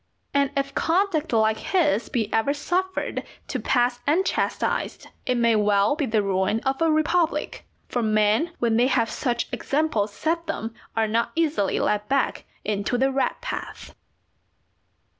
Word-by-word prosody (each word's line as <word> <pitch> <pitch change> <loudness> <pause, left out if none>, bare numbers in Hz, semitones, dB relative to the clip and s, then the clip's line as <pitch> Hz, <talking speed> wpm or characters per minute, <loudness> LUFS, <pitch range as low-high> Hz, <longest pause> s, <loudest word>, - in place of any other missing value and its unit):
And 280 -1 +3
if 275 0 -1
conduct 335 -2 +1
like 220 -1 +2
his 300 - +1
be 220 -3 -2
ever 275 +6 +2
suffered 370 +5 -2 0.3
to - - -3
pass 245 -1 +1
unchastised, 345 +7 0 0.2
it 250 - +1
may 235 -1 +3
well 205 +3 +3
be 295 -3 -1
the 220 -2 +1
ruin 190 +2 +1
of 270 +3 -1
a 330 - +4
republic, 320 +2 0 0.2
for 245 - -1
men 215 +8 +2
when 230 -2 +1
they 245 +2 +4
have 245 -4 +1
such 240 -3 -1
examples 245 -5 0
set 330 +10 -2
them 230 -8 -4 0.2
are 225 -1 +2
not 230 +2 0
easily 310 -11 +1
led 210 0 0
back 275 -1 0 0.2
into 205 +3 -1
the 265 +2 +2
right 270 0 0
path. - - -6
250 Hz, 150 wpm, -24 LUFS, 220-310 Hz, 0.3 s, a